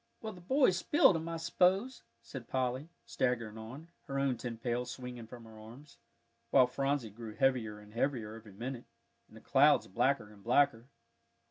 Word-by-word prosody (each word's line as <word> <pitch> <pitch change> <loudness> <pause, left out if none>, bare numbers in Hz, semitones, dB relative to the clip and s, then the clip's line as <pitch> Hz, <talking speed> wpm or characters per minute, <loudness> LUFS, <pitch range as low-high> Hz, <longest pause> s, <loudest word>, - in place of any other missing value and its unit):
"Well, 220 -1 -6
the 180 - -13
boys 230 -1 +3
spilled 200 -4 +4
'em, 165 +1 -3
I 165 - -3
s'pose," 190 +9 +1 0.2
said 130 -4 -9
Polly, 130 +3 -2 0.2
staggering 115 -4 -1
on, 130 +9 -9 0.2
her 135 - -3
own 135 -2 +1
tin 115 0 -6
pail 120 +1 -1
swinging 125 -2 -8
from 120 0 -11
her 110 -1 -13
arms, 120 +7 -14 0.5
while 130 0 +6
Phronsie 135 -2 -1
grew 110 0 -9
heavier 125 -6 +1
and 105 0 -15
heavier 115 -3 -1
every 110 -2 -12
minute, 120 +4 -6 0.4
and 110 - -16
the - - -14
clouds 145 +2 +4
blacker 120 0 0
and 100 -1 -18
blacker. 125 0 +2
125 Hz, 170 wpm, -33 LUFS, 115-140 Hz, 0.5 s, while